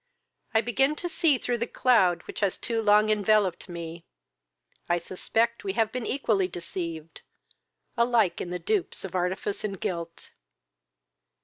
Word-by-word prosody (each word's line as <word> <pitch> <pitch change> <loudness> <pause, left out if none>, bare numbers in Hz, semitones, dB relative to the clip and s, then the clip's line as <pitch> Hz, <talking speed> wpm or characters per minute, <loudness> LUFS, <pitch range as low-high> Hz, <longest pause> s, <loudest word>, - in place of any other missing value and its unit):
I 220 - +6
begin 270 +6 +1
to 350 - -4
see 330 -5 +2
through 245 -1 -2
the 235 - -1
cloud 185 -9 +3
which - - -8
has 200 -3 0
too 230 -2 -2
long 210 0 +5
enveloped 205 -3 +2
me. 170 -1 -7 0.9
I 175 - +3
suspect 225 +7 -1
we 195 - -2
have 220 0 +1
been 250 -3 -4
equally 220 -8 +1
deceived, 170 -2 -6 0.7
alike 235 -5 +3
the 180 0 -3
dupes 405 - -1
of 190 - -7
artifice 185 +2 -2
and 200 -3 -3
guilt." 170 -2 -5
205 Hz, 140 wpm, -27 LUFS, 175-235 Hz, 0.9 s, I